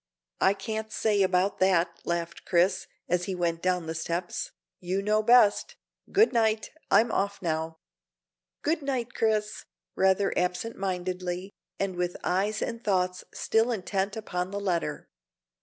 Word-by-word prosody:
"I 195 - +4
can't 220 +1 -4
say 210 -2 +1
about 190 +1 +2
that," 175 -2 +2
laughed 170 0 -3
Chris, 180 +2 +2 0.2
as 180 0 +1
he 190 - -3
went 170 -2 -1
down 180 -2 0
the 160 - -3
steps. 170 +2 -3 0.3
"You 185 +2 -1
know 215 +1 +2
best; 225 -2 +4 0.4
good 420 - +4
night, 220 -2 +1 0.2
I'm 230 - +4
off 200 +1 -1
now." 160 -1 -2 0.9
"Good 320 +2 +1
night, 260 -4 -2
Chris," 215 -1 0 0.3
rather 190 +1 +3
absent 180 +6 -1
mindedly, 185 0 -3 0.3
and 195 -2 -1
with 175 0 -2
eyes 200 +4 0
and 230 +1 -4
thoughts 180 -3 0
still 225 +2 +1
intent 200 -1 -2
upon 180 -4 -3
the 200 +1 -4
letter. 170 -6 -2
190 Hz, 140 wpm, -28 LUFS, 180-215 Hz, 0.9 s, I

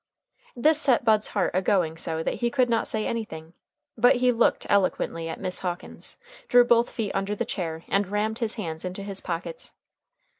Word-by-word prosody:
This 305 +5 +3
set 250 -3 +3
Bud's 215 -1 +3
heart - - 0
a 185 - +2
going 180 -5 +1
so 160 0 -2
that - - -1
he 240 - +2
could 250 -1 +1
not 230 - +1
say 215 -1 -1
anything, 165 -8 -5 0.4
but 245 +2 +5
he 250 0 +3
looked 235 -1 +2
eloquently 165 -4 0
at - - -6
Miss 185 - -2
Hawkins, 175 -1 -5 0.3
drew 245 0 +6
both 235 0 +4
feet 215 -4 -3
under 200 +2 -1
the - - -2
chair, 165 -3 -4
and 200 0 +1
rammed 210 +3 -1
his 230 -2 -2
hands 165 -8 -5
into 185 +2 -5
his 195 -1 -5
pockets. 180 - -5
205 Hz, 190 wpm, -26 LUFS, 175-235 Hz, 0.4 s, drew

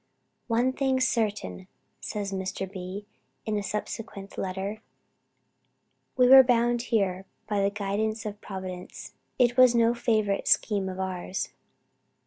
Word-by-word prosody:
"One 245 +2 +2
thing 265 -1 +1
is 260 0 +3
certain," 210 -5 -2 0.3
says 205 -2 -4
Mr. 190 0 -3
B. 190 +1 -7 0.4
in 215 -1 -1
a 205 - 0
subsequent 205 0 -5
letter 195 +3 -4 1.4
"we 250 -1 +6
were 265 +1 +11
brought 240 -1 +2
here 195 -6 -1 0.2
by 205 -2 0
the 200 - +3
guidance 210 +2 -2
of 210 0 -6
Providence. 185 -2 -7 0.2
It 245 -1 +3
was 255 -2 +7
no 230 0 +4
favorite 215 -4 0
scheme 200 -3 +2
of 185 0 -6
ours." 185 0 -3
210 Hz, 130 wpm, -27 LUFS, 195-235 Hz, 1.4 s, were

